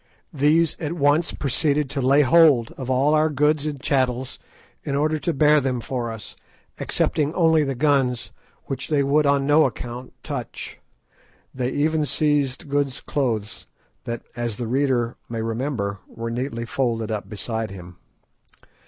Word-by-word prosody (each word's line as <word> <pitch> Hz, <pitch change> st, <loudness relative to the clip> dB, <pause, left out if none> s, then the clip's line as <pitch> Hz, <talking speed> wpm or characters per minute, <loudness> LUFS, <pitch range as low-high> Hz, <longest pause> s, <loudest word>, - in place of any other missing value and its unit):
These 155 Hz, +3 st, +3 dB
at 160 Hz, -1 st, -3 dB
once 150 Hz, +1 st, +2 dB
proceeded 145 Hz, +1 st, 0 dB
to 140 Hz, -2 st, -2 dB
lay 140 Hz, +3 st, +5 dB
hold 140 Hz, -5 st, +5 dB
of 130 Hz, -2 st, -7 dB
all 135 Hz, +4 st, +3 dB
our 155 Hz, +1 st, +3 dB
goods 150 Hz, +1 st, +1 dB
and 145 Hz, -2 st, -4 dB
chattels, 130 Hz, -2 st, -1 dB, 0.4 s
in 140 Hz, -, -2 dB
order 155 Hz, +2 st, +1 dB
to 160 Hz, +4 st, -1 dB
bear 150 Hz, 0 st, +4 dB
them 130 Hz, -2 st, -1 dB
for 120 Hz, -1 st, -3 dB
us, 110 Hz, -1 st, -9 dB, 0.4 s
excepting 150 Hz, -1 st, +1 dB
only 160 Hz, -3 st, +4 dB
the 135 Hz, -2 st, -2 dB
guns, 135 Hz, -3 st, +1 dB, 0.3 s
which 135 Hz, -1 st, -4 dB
they 145 Hz, -3 st, +2 dB
would 145 Hz, +2 st, +3 dB
on 140 Hz, -1 st, +2 dB
no 150 Hz, +2 st, +5 dB
account 125 Hz, 0 st, -5 dB
touch. -, -, -6 dB, 0.7 s
They 125 Hz, -1 st, -2 dB
even 155 Hz, +2 st, 0 dB
seized 145 Hz, -1 st, 0 dB
Good's 140 Hz, -2 st, -1 dB
clothes, 115 Hz, -7 st, -3 dB, 0.4 s
that, 120 Hz, 0 st, -4 dB
as 120 Hz, -3 st, -3 dB
the 120 Hz, -, -3 dB
reader 125 Hz, -1 st, 0 dB
may 115 Hz, -1 st, -3 dB
remember, 115 Hz, -4 st, -2 dB
were 115 Hz, 0 st, -6 dB
neatly 115 Hz, -1 st, -3 dB
folded 115 Hz, -3 st, -1 dB
up 105 Hz, -1 st, -4 dB
beside 110 Hz, +1 st, -3 dB
him. 90 Hz, -2 st, -11 dB
135 Hz, 155 wpm, -23 LUFS, 120-150 Hz, 0.7 s, lay